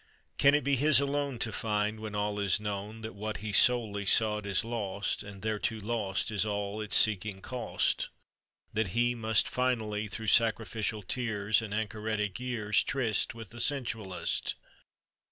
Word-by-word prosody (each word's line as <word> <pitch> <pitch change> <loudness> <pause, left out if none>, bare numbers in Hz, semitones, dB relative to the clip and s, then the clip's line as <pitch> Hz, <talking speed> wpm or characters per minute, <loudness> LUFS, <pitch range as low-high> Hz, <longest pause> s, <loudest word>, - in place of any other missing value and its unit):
"Can 140 +1 +6
it 150 - +1
be 140 +1 +2
his 145 0 +5
alone, 140 -2 -1
To 115 0 -1
find, 105 0 -1
when 110 -1 -6
all 105 0 -1
is 100 0 +2
known, 105 +1 -5
That 110 0 -6
what 110 +1 -4
He 105 0 -5
solely 110 -1 +4
sought 105 +1 +2
"Is 100 +2 +1
lost, 105 -4 -2
and 100 -1 -10
thereto 110 0 -1
lost 105 -2 -1
All 105 0 -3
that 110 - -3
its 105 - +1
seeking 105 -2 +3
cost? 120 +1 -1 0.6
That 110 -2 -1
he 120 0 +3
Must 110 -2 +1
finally, 110 -4 -1
"Through 110 +2 -4
sacrificial 110 -2 +1
tears, 110 -1 +1
And 110 -3 -7
anchoretic 110 -1 -2
years, 115 -5 +1
Tryst 115 -6 0
With 115 -4 -9
the 120 - -7
sensualist?" 115 -8 -1
110 Hz, 155 wpm, -30 LUFS, 105-115 Hz, 0.6 s, Can